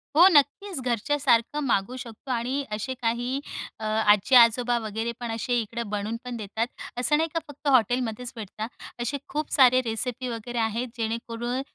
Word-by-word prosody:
हो, 345 +4 +9
नक्कीच. 320 +4 +2
घरच्यासारखं 250 +2 +1
मागवू 230 +1 +1
शकतो 245 +1 -8
आणि 255 +4 -1
असे 215 +5 -3
काही 240 +3 -1 0.4
अ, - - -8
आजी-आजोबा 230 +3 +5
वगैरे 220 +1 -3
पण 240 -2 -4
असे 240 +2 0
इकडं 230 0 -5
बनवून 210 +2 -2
पण 245 -1 -4
देतात. 220 +2 -2 0.3
असं 255 +5 +3
नाही 325 +1 0
का 330 - +1
फक्त 290 0 -9
हॉटेलमध्येच 245 -2 +2
भेटतात. 220 0 -6 0.3
असे 240 +4 -1
खूप 305 +1 -3
सारे 255 -2 +6
रेसिपी 245 +3 -2
वगैरे 240 +1 -5
आहेत, 225 +2 -1
जेणेकरून 230 +2 -3
240 Hz, 155 wpm, -26 LUFS, 225-260 Hz, 0.4 s, हो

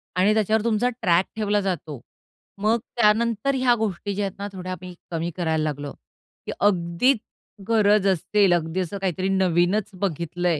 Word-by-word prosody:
आणि 190 +4 +3
त्याच्यावर 215 0 +1
तुमचा 235 +1 +1
ट्रॅक 175 +1 +3
ठेवला 210 -1 +1
जातो. 160 -8 -4 0.6
मग 220 +3 +2 0.2
त्यानंतर 230 +3 +2
ह्या 255 -2 +3
गोष्टी 205 -3 -3
ज्या 205 +1 -1
आहेत 195 - -6
ना, 200 - -3
थोड्या 185 -1 -6
आम्ही 185 0 -7 0.2
कमी 165 0 -2
करायला 160 -3 0
लागलो 145 -2 -3 0.5
की - - -4
अगदीच 190 +6 +2 0.5
गरज 210 -3 +3
असेल, 195 +1 +3
अगदी 165 +1 -1
असं 185 +2 -3
काहीतरी 190 0 -1
नवीनच 190 +2 +2
बघितलंय 170 -2 -1
190 Hz, 155 wpm, -24 LUFS, 175-210 Hz, 0.6 s, आणि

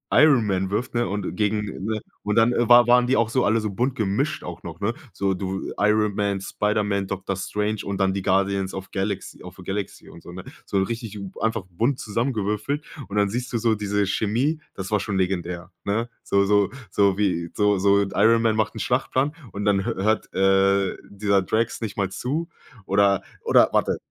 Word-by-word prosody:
Iron 140 -8 +6
Man 95 -1 0
wirft, 105 +5 -2
ne? 120 0 +1
Und 100 -3 -3
gegen, 105 +1 0 0.2
ne 110 -1 -1 0.2
Und 105 0 -1
dann 115 +2 +5 0.2
war 120 -1 +8
waren 125 0 +5
die 130 - +2
auch 115 -1 +2
so 125 +2 +1
alle 110 +2 +2
so 105 -2 -3
bunt 125 +6 -1
gemischt 110 +9 -1
auch - - -7
noch, - - -8
ne? - - 0 0.2
So 95 -1 0
du 95 +1 -4
Iron 105 0 +3
Man, 100 -1 0
Spiderman, 105 -1 -1
Doktor 95 0 -3
Strange 105 +2 -2
und 100 -1 -3
dann 95 0 +2
die 95 - -2
Guardians 95 0 +1
of 95 0 -7
Galax 100 0 -3
of 90 0 -10
the 90 - -11
Galaxy 95 +1 -5
und 85 - -13
so, 85 - -10
ne? 90 +1 -8 0.2
So 100 - -1
'n 95 - +3
richtig 115 -2 -5 0.2
einfach 115 -2 0
bunt 120 +10 0
zusammengewürfelt. 115 +4 -2 0.3
Und 100 - -4
dann 100 -1 +3
siehst 120 +4 -4
du 115 - +2
so 115 0 +2
diese 105 -1 0
Chemie, 125 +11 0
das 95 +1 -6
war 105 - +3
schon 100 -1 -2
legendär, 90 -1 -2
ne? 115 +4 -1
So 100 0 +2
so 100 -1 +3 0.2
so 100 -1 +3
wie 90 -5 0
so 105 -2 +2
so 100 +1 +4
Iron 115 +3 +4
Man 110 -1 +2
macht 110 +1 0
'n - - -5
Schlachtplan 130 +5 0 0.2
und 100 +2 -4
dann 100 -2 +2
hö - - -1
hört, 110 +3 0
äh, 95 0 +3
dieser 100 -1 +1
Drax 115 +5 -1
nicht 105 -2 -5
mal 100 -2 0
zu 155 - -3 0.4
oder 100 -1 +3 0.2
oder - - +5
warte - - +2
105 Hz, 205 wpm, -24 LUFS, 95-115 Hz, 0.4 s, war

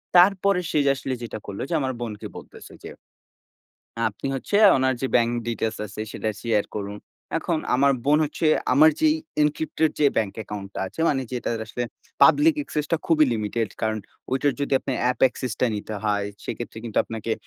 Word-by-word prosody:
তারপরে 195 +1 +5
সে - - 0
যে - - +4
আসলে 135 0 -4
যেটা 115 - -5
করলো 100 -1 -6
যে - - -2
আমার 130 -2 -1
বোনকে 110 -3 -5
বলতেছে - - -12
যে - - -7 1.2
"আপনি 105 +3 -2
হচ্ছে 135 +9 -1 0.2
ওনার 130 0 +2
যে 135 - 0
bank 120 -1 +3 0.2
details 110 -1 -2
আছে 100 +1 -8
সেটা 110 - -2
শেয়ার 110 -3 +1
করুন।" 100 0 -4 0.4
এখন 165 0 -1 0.2
আমার 140 +2 +4
বোন 145 +2 +4
হচ্ছে 155 +2 -2 0.3
আমার 155 +4 +7
যে 315 - +5 0.3
encrypted 155 +1 +1
যে 150 - +6
ব্যাংক 105 -3 +1
অ্যাকাউন্টটা 100 -2 -6
আছে, 95 - -8
মানে 135 -2 +1
যেটার 120 -2 -2
আসলে 120 +3 -3 0.4
public 315 +2 +6
access 150 - -3
টা - - +5
খুবই 155 -2 +5
লিমিটেড। 110 0 -1
কারণ 110 0 0 0.3
ওইটার 135 +2 +2
যদি 140 - -2
আপনার 130 - -3
app 125 - -5
access 125 -1 -5
টা 125 - +4
নিতে 105 +1 -5
হয়, 105 -1 +1 0.2
সেক্ষেত্রে 120 -1 -6
কিন্তু 115 -3 -1
আপনাকে 115 0 -4
125 Hz, 180 wpm, -24 LUFS, 110-150 Hz, 1.2 s, আমার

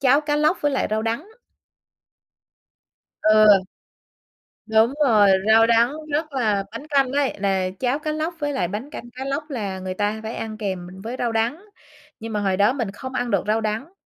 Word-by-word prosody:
cháo 280 +1 +4
cá 295 -1 -1
lóc 310 +4 +2
với 290 - +1
lại 270 - 0
rau 215 0 0
đắng. 230 - -3 1.9
Ừ. 215 0 +5 1.2
Đúng 220 +3 +3
rồi, 210 -6 +5 0.2
rau 225 +1 +6
đắng 235 +3 +3 0.2
rất 305 0 -1
là 215 -6 +1
bánh 250 +7 -8
canh 275 -3 +2
ấy, 280 -1 +1
là 190 -2 0
cháo 260 +3 0
cá 305 0 -3
lóc 310 +3 -2
với 290 -1 -2
lại 260 -10 0
bánh 210 +10 -5
canh 240 -5 -9
cá 265 +1 -5
lóc 275 +3 -2
là 200 -8 -4
người 185 0 -4
ta 205 +3 -1
phải 220 - -5
ăn 220 -1 -5
kèm 190 -4 -4 0.2
với 230 +3 -5
rau 240 -1 0
đắng. 235 - -1 0.5
Nhưng 225 0 -6
mà 210 - 0
hồi 190 -2 0
đó 205 +5 +4
mình 235 -8 -3
không 260 +6 -8
ăn 245 -1 -2
được - - +1
rau 220 +1 +1
đắng, 220 - -3
230 Hz, 195 wpm, -22 LUFS, 215-280 Hz, 1.9 s, rau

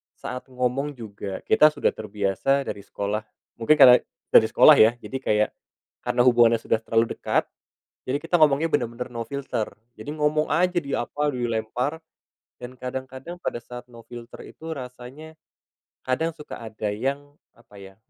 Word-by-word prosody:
saat 125 - -7
ngomong 130 +3 -2
juga, 100 -4 -7
kita 155 - +7
sudah 145 - +1
terbiasa 105 +6 -1
dari 100 -1 -6
sekolah 105 +2 -3 0.3
mungkin 115 +7 +4
karena 125 -2 +10 0.3
dari - - +7
sekolah, - - +7
ya, 110 +1 +7
jadi 135 - -5
kayak, 105 0 +2 0.6
karena 125 - +1
hubungannya 120 -2 +5
sudah - - +1
terlalu 115 0 0
dekat, - - 0 0.6
jadi 130 +2 -1
kita 165 +1 +1
ngomongnya 150 +2 +4
bener-bener 120 -3 -2
no 115 -1 -4
filter. 130 -4 -4 0.3
Jadi 145 - -7
ngomong 150 0 0
aja, 180 +3 +2
di 140 -1 -7
apa, 145 +4 -1
dilempar, 120 +5 -2 0.6
dan 125 +1 -9
kadang-kadang 130 +6 -7
pada - - -3
saat 125 0 -10
no 115 -1 -14
filter 120 -1 -11
itu 160 - -11
rasanya, 130 +5 -10 0.7
kadang 160 +6 0
suka 150 -2 -9
ada 110 -2 -4
yang 140 +6 -4 0.2
apa 115 -3 -19
ya, 95 0 -12
125 Hz, 155 wpm, -24 LUFS, 115-145 Hz, 0.7 s, karena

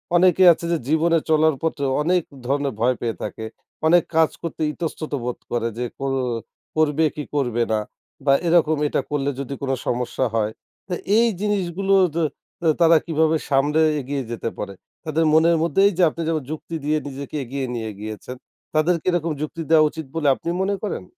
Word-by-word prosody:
অনেকেই 180 +1 +5
আছে 170 - -8
যে 170 - +2
জীবনে 165 +2 +3
চলার 155 -1 +4
পথে 160 -3 -1 0.2
অনেক 175 +3 +2 0.2
ধরনের 140 0 0
ভয় 125 +3 +2
পেয়ে 115 -2 -2
থাকে। 110 - -5 0.4
অনেক 175 0 +5
কাজ 160 -1 +5
করতে 165 - -5
ইতস্তত 160 -1 -5
বোধ 125 0 -3
করে 115 -1 0
যে, 125 - -1
কর 135 0 -1 0.6
করবে 155 0 +2
কি 150 - -4
করবে 120 -4 +1
না 110 - +2 0.5
বা 140 - +5
এরকম 160 -2 +4
এটা - - 0
করলে 145 -1 0
যদি 140 0 -4
কোন 135 -1 -1 0.2
সমস্যা 125 +1 -1
হয়। 110 -1 +1 0.4
তো 185 - -4 0.2
এই 235 +1 +5
জিনিসগুলো 195 -2 0 0.9
তারা 165 -1 +7
কিভাবে 160 -1 +2
সামলে 145 +3 +3 0.2
এগিয়ে 140 0 -3
যেতে 115 0 -3
পারে? 100 -1 -5 0.3
তাদের 160 +1 +1
মনের 165 +1 +5
মধ্যে 170 +3 +2
এই 200 - +1
যে 185 - +4
আপনি 165 - -7
যেমন 160 -3 0
যুক্তি 160 +1 -6
দিয়ে 155 +1 +2
নিজেকে 140 +1 -7
এগিয়ে 135 +2 -4
নিয়ে 110 -2 -4
গিয়েছেন 110 +4 -7 0.4
তাদের 160 +3 +3
কি - - -47
এরকম 170 -2 0
যুক্তি 155 +2 -4
দেওয়া 155 -1 +6
উচিত 160 0 -7
বলে 155 -3 0
আপনি 170 - -5
মনে 200 +1 +1
করেন? 210 - -3
155 Hz, 180 wpm, -22 LUFS, 135-165 Hz, 0.9 s, তারা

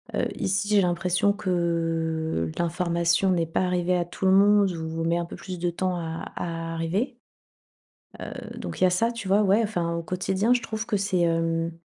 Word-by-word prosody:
Heu, - - +1
ici 200 +2 0
j'ai 210 -2 +5
l'impression 180 +2 +1
que 165 - -1
l'information 170 +2 +1
n'est 170 -2 +1
pas 165 - -1
arrivée 180 0 +1
à 175 - +1
tout 180 +2 -5
le 190 - +5
monde 200 0 +5
ou 160 0 -4
met 170 +1 +2
un 170 - -1
peu - - -9
plus 185 -2 -7
de 175 +1 0
temps 185 +1 -1
à 165 -1 -5
à 165 -1 -4
arriver. 190 +11 -1 1.1
Heu, - - -7
donc - - -6
il - - +5
y - - +7
a - - +1
ça, 230 +6 +1
tu 230 -5 -6
vois? 200 +2 +4
Ouais, 205 +3 +4
enfin, 175 -6 -1
au 170 - -2
quotidien 190 +6 0
je 245 - 0
trouve 220 0 -4
que 220 - 0
c'est, 195 -2 0
hem 165 0 +1
175 Hz, 200 wpm, -25 LUFS, 165-195 Hz, 1.1 s, y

